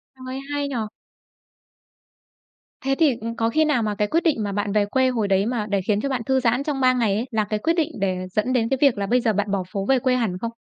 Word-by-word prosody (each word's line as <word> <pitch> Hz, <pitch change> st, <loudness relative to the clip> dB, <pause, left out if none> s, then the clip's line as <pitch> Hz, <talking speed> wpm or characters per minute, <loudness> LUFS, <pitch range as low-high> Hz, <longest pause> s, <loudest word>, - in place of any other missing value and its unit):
Trời, 260 Hz, 0 st, -7 dB
hay 285 Hz, 0 st, -1 dB
nhỉ! 280 Hz, -, -5 dB, 2.1 s
Thế 270 Hz, 0 st, +2 dB
thì, 290 Hz, -7 st, +3 dB
ừ, 225 Hz, -, -4 dB
có 225 Hz, 0 st, +1 dB
khi 315 Hz, +7 st, +2 dB
nào 285 Hz, -7 st, +1 dB
mà 210 Hz, -1 st, -1 dB
cái 210 Hz, 0 st, 0 dB
quyết 330 Hz, +9 st, +1 dB
định 295 Hz, -10 st, +1 dB
mà 205 Hz, -, -2 dB
bạn 205 Hz, +1 st, -2 dB
về 210 Hz, -1 st, +3 dB
quê 260 Hz, +5 st, +2 dB
hồi 225 Hz, -5 st, -1 dB
đấy 195 Hz, 0 st, +2 dB
mà 230 Hz, -2 st, -1 dB
để 200 Hz, -1 st, +1 dB
khiến 205 Hz, +2 st, 0 dB
cho 275 Hz, -, -2 dB
bạn 260 Hz, -3 st, -1 dB
thư 265 Hz, 0 st, +2 dB
giãn 245 Hz, +1 st, +1 dB
trong 285 Hz, -2 st, -2 dB
3 255 Hz, 0 st, +5 dB
ngày 230 Hz, -5 st, +1 dB
ấy, 225 Hz, +4 st, -1 dB
là 220 Hz, -1 st, +1 dB
cái 210 Hz, 0 st, -2 dB
quyết 325 Hz, +8 st, +1 dB
định 330 Hz, -3 st, 0 dB
để 190 Hz, -2 st, 0 dB
dẫn 215 Hz, +6 st, 0 dB
đến 230 Hz, -3 st, +1 dB
cái 270 Hz, -, +1 dB
việc 275 Hz, -6 st, +4 dB
là 200 Hz, -, -1 dB
bây 245 Hz, +5 st, +2 dB
giờ 225 Hz, -2 st, +1 dB
bạn 205 Hz, 0 st, -1 dB
bỏ 195 Hz, -2 st, 0 dB
phố 195 Hz, -1 st, -3 dB
về 265 Hz, +2 st, +3 dB
quê 255 Hz, 0 st, +1 dB
hẳn 220 Hz, -8 st, -1 dB
không? 230 Hz, +4 st, -4 dB
230 Hz, 275 wpm, -23 LUFS, 205-265 Hz, 2.1 s, 3